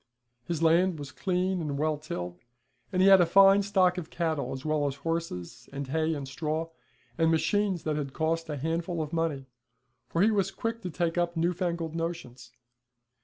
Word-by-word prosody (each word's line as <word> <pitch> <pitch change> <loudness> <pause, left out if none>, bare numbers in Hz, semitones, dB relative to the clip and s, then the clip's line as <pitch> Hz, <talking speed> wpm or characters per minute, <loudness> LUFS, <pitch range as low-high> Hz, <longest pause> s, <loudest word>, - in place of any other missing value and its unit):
His 165 +1 -2
land 170 +2 +4
was 145 -3 -7
clean 185 +4 -1
and 145 -3 -3
well 155 +1 +1
tilled, 145 - -6 0.5
and 185 0 +2
he - - +6
had 195 -1 +8
a - - +5
fine 195 +2 +7
stock 185 -2 +2
of 160 - -8
cattle 160 -6 -2
as 130 +1 -6
well 155 -2 +1
as 135 - -3
horses, 140 - -4
and 140 -1 -5
hay, 160 +2 0
and 140 -2 -5
straw, 155 +4 -3 0.5
and 165 0 +4
machines 190 +3 +1
that 155 -1 -1
had 140 -2 -3
cost 165 +2 -1
a 150 - -3
handful 165 +3 -2
of 155 +2 -8
money, 160 -5 -1 0.6
for 170 - +2
he 220 - +4
was 200 -4 +1
quick 230 0 -4
to 180 - -4
take 170 0 -1
up 170 -1 -1
new 170 +2 +2
fangled 170 -3 -2
notions. 165 -8 -5
165 Hz, 190 wpm, -28 LUFS, 150-180 Hz, 0.6 s, had